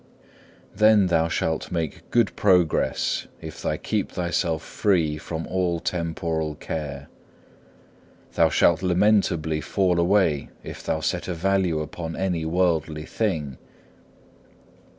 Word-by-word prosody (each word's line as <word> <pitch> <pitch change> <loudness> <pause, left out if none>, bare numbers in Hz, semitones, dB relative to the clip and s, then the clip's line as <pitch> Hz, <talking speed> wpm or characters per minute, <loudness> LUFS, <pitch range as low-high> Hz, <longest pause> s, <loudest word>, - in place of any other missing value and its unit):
3. - - -21
Then 105 -1 +5
thou 85 -2 +2
shalt 80 -1 -2
make 80 -4 -4
great 120 -3 +2
progress 90 -5 +2
if 80 +1 -9
thou 75 - -1
keep 105 +5 -2
thyself 85 -3 -1
free 80 -7 0
from 80 +1 -5
all 90 -2 -1
temporal 80 -2 -2
care. 70 -2 -5 1.3
Thou - - +4
shalt 85 0 +3
lamentably 90 -4 +2
fall 90 -2 +1
away 85 -5 +2
if - - -8
thou - - -1
set - - -2
a 90 - -2
value 90 -2 +1
upon 80 +2 -6
any 90 -4 -1
worldly 80 -3 0
thing. 80 - -2
85 Hz, 120 wpm, -24 LUFS, 80-95 Hz, 1.3 s, Then